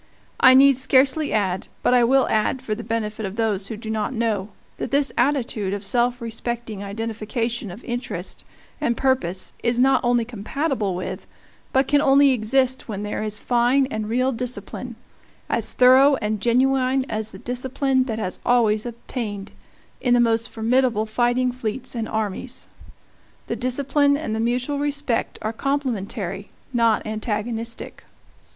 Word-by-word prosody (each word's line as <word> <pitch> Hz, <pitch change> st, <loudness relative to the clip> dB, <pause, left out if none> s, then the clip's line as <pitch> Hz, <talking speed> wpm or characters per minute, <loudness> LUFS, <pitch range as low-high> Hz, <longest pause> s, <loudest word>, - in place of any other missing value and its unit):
I 260 Hz, 0 st, +8 dB
need 275 Hz, 0 st, +7 dB
scarcely 265 Hz, +3 st, +3 dB
add, 190 Hz, -3 st, 0 dB, 0.2 s
but -, -, +3 dB
I 245 Hz, -1 st, +5 dB
will 265 Hz, +3 st, +4 dB
add 220 Hz, +4 st, 0 dB
for 215 Hz, -, -2 dB
the 225 Hz, +2 st, -5 dB
benefit 220 Hz, -1 st, -3 dB
of 195 Hz, 0 st, -4 dB
those 210 Hz, -4 st, 0 dB
who 220 Hz, -, -6 dB
do 220 Hz, 0 st, -6 dB
not 220 Hz, +4 st, -2 dB
know, 220 Hz, -4 st, -1 dB, 0.3 s
that -, -, -4 dB
this 280 Hz, 0 st, +2 dB
attitude 240 Hz, -7 st, 0 dB
of 205 Hz, -, -6 dB
self 240 Hz, +4 st, +1 dB
respecting 230 Hz, -2 st, -4 dB
identification 225 Hz, +2 st, -3 dB
of 190 Hz, +6 st, -10 dB
interest 245 Hz, +1 st, -4 dB, 0.4 s
and 235 Hz, -1 st, +1 dB
purpose 190 Hz, -9 st, 0 dB
is 235 Hz, 0 st, 0 dB
not 265 Hz, +1 st, +4 dB
only 240 Hz, -1 st, +2 dB
compatible 235 Hz, -, -2 dB
with 185 Hz, -, -5 dB, 0.4 s
but 265 Hz, 0 st, +2 dB
can 290 Hz, 0 st, +3 dB
only 275 Hz, 0 st, +5 dB
exist 260 Hz, +2 st, +1 dB
when 205 Hz, -3 st, -4 dB
there 210 Hz, -, -3 dB
is 210 Hz, -1 st, -3 dB
fine 245 Hz, +4 st, +2 dB
and 215 Hz, -1 st, -3 dB
real 255 Hz, +3 st, +1 dB
discipline, 250 Hz, 0 st, -5 dB, 0.5 s
as -, -, +1 dB
thorough 260 Hz, +3 st, +6 dB
and 215 Hz, -4 st, -2 dB
genuine 260 Hz, +2 st, +2 dB
as 220 Hz, -2 st, -2 dB
the -, -, -10 dB
discipline 260 Hz, +3 st, 0 dB
that 225 Hz, -4 st, -3 dB
has 185 Hz, -4 st, -4 dB
always 230 Hz, -2 st, +2 dB
obtained 225 Hz, -4 st, -5 dB, 0.5 s
in 245 Hz, -1 st, +3 dB
the -, -, +4 dB
most 230 Hz, 0 st, +2 dB
formidable 230 Hz, -1 st, +1 dB
fighting 245 Hz, +3 st, +1 dB
fleets 245 Hz, 0 st, -4 dB
and 230 Hz, -2 st, -3 dB
armies. 220 Hz, +4 st, -3 dB, 0.8 s
The -, -, -3 dB
discipline 280 Hz, +3 st, +1 dB
and 285 Hz, -8 st, -4 dB
the -, -, -2 dB
mutual 250 Hz, +5 st, -1 dB
respect 285 Hz, -4 st, -1 dB
are 220 Hz, +1 st, -2 dB
complementary, 220 Hz, -8 st, -3 dB, 0.3 s
not 230 Hz, -2 st, +2 dB
antagonistic. 220 Hz, +1 st, -4 dB
235 Hz, 155 wpm, -23 LUFS, 215-260 Hz, 0.8 s, I